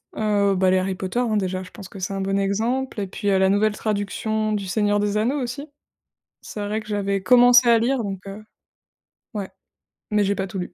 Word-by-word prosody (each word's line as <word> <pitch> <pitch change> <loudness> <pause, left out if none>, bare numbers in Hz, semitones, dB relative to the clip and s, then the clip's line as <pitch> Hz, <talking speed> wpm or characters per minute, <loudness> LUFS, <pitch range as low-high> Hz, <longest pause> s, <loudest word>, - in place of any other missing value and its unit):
Heu 205 -2 +1
bah 185 0 +2
les 185 - +3
Harry 190 +1 -1
Potter 190 +6 -3
hein 225 -4 +1
déjà 185 -1 -2
je 180 - -13
pense 195 -2 -11
que 200 - -12
c'est 185 +2 -3
un 195 - -3
bon 195 +1 0
exemple 225 +5 -1
et 195 - -3
puis, 200 +2 -3
heu, 195 -1 +3
la 190 0 +4
nouvelle 210 +2 +2
traduction 215 +1 -2
du 200 -2 -3
Seigneur 205 +1 +1
des 205 0 0
Anneaux 260 +6 0
aussi. 265 +5 -5 0.8
C'est 210 - -8
vrai 215 +2 -2
que 215 - -14
j'avais 200 -2 -1
commencé 245 +3 +6
à 230 -1 +6
lire 240 +2 0
donc 195 -2 -4
heu, 200 +2 -8 0.9
ouais. 200 -3 -4 0.6
Mais 210 -1 +3
j'ai 200 +1 0
pas 195 0 -3
tout 195 -1 -6
lu. 180 0 -6
205 Hz, 225 wpm, -22 LUFS, 195-220 Hz, 0.9 s, commencé